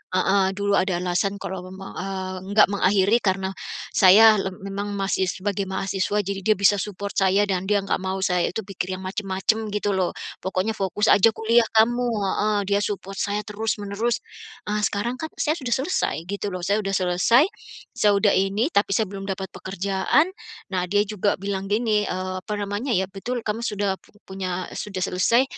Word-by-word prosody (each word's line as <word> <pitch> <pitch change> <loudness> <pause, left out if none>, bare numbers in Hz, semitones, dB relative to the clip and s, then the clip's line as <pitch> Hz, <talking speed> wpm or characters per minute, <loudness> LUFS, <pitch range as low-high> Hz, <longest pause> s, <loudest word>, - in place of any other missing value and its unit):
heeh, 190 +1 +3
dulu 200 0 -1
ada 185 -2 0
alasan 185 +3 0
kalo 190 0 -5
memang, 190 0 -9
eee, 190 0 -4 0.2
enggak 210 +1 +6
mengakhiri 200 +3 +3
karena 190 -1 0 0.4
saya 210 +3 +7
lem 190 -1 -3
memang 200 +1 -4
masih 195 -1 0
sebagai 195 +1 -2
mahasiswa. 195 +1 -1
Jadi 195 +1 -3
dia 215 +1 +3
bisa 200 +1 +4
support 200 0 -4
saya 195 +1 +3
dan 190 -2 -1
dia 205 -1 +2
enggak 195 - -1
mau 190 0 -3
saya 180 -2 +2
itu 220 - -4
pikir 185 -1 -4
yang 190 - -9
macam-macam 200 +3 -1
gitu 205 0 0
loh. 185 -2 0 0.3
"Pokoknya 190 +3 -1
fokus 195 +1 0
aja 220 +3 +6
kuliah 230 +1 +3
kamu" 240 +3 +4 0.2
heeh, 210 +2 +1
dia 200 0 +2
support 195 -1 -4
saya 205 +1 -1
terus-menerus. 210 +2 -2 0.4
Eee, 210 0 0
sekarang 240 +5 -3
kan, 315 - -3
saya 305 +1 0
sudah 245 -3 0
selesai 315 +9 0
gitu 200 +1 -3
loh, 180 - -6
saya 200 +4 +1
udah 195 -2 -1
selesai, 185 +9 +4 0.5
saya 210 - +3
udah 200 0 +3
ini, 200 - +1
tapi 200 0 +2
saya 220 - +1
belum 195 0 -6
dapat 190 -1 -4
pekerjaan. 195 - 0 0.4
Nah, 180 -1 0
dia 205 +2 +2
juga 205 -1 0
bilang 195 -1 -3
gini, 215 -1 +2
eee, 185 0 -3
apa 210 - -4
namanya 205 +6 -3
ya, 190 +1 +1
"Betul, 235 +5 -4
kamu 215 +1 -2
sudah 205 -3 -1
pu - - -25
punya, 185 -1 -4
sudah 195 -3 -4
selesai, 215 +7 +3
200 Hz, 180 wpm, -24 LUFS, 190-210 Hz, 0.5 s, saya